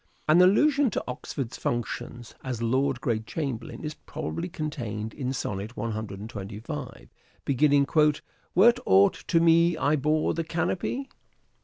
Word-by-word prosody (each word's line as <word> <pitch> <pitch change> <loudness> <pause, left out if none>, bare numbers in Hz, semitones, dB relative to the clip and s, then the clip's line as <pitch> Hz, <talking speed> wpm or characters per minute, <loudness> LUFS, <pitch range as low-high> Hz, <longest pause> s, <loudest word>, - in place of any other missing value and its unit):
An 155 +4 +6
allusion 280 +9 +4
to - - -2
Oxford's 125 0 -5
functions 120 0 -4
as 130 -3 -3
Lord 130 +3 +1
Great 110 -3 -1
Chamberlain 135 -5 -4
is 155 0 -4
probably 110 - -5
contained 120 -10 -4
in 130 -1 -3
Sonnet 105 -2 -4
125 105 -4 -6 0.4
beginning, 140 +1 +3 0.4
" - - -38
Were't 235 +7 +6
aught 95 +1 +6
to 165 - +3
me 170 0 +4
I 150 0 +2
bore 155 +2 +1
the 165 - -2
canopy 180 - -2
135 Hz, 130 wpm, -27 LUFS, 110-165 Hz, 0.4 s, An